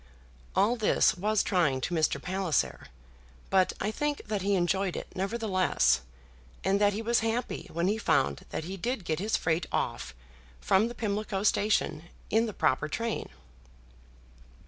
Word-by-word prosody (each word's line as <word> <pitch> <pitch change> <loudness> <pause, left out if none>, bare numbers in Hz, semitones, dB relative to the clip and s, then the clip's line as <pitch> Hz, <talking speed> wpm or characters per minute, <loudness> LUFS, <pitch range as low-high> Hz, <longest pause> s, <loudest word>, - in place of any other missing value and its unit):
All 220 +5 +3
this 220 - +3
was 210 +3 +1
trying 165 -8 +2
to 175 - -2
Mr. 155 -4 +1
Palliser; 180 -2 -1 0.6
but 190 -1 +4
I 210 - -1
think 295 +5 -2
that 210 -2 -2
he 200 +1 +1
enjoyed 190 +1 +1
it, - - -4
nevertheless, 185 - +1 0.6
and 200 +1 +2
that 205 0 +4
he 220 +3 -3
was 235 +1 +2
happy 225 +2 -2
when 170 +2 0
he 210 +3 +1
found 70 - +1
that - - -4
he 190 +4 -6
did 235 0 -3
get 160 -1 -1
his 215 +4 +1
freight 165 +1 0
off - - -2 0.4
from 190 - +3
the 240 - -7
Pimlico 205 -2 -2
Station 205 -6 +1 0.3
in 225 +2 +3
the - - -3
proper 150 -2 +1
train. 230 +8 -3
195 Hz, 155 wpm, -29 LUFS, 175-220 Hz, 0.6 s, but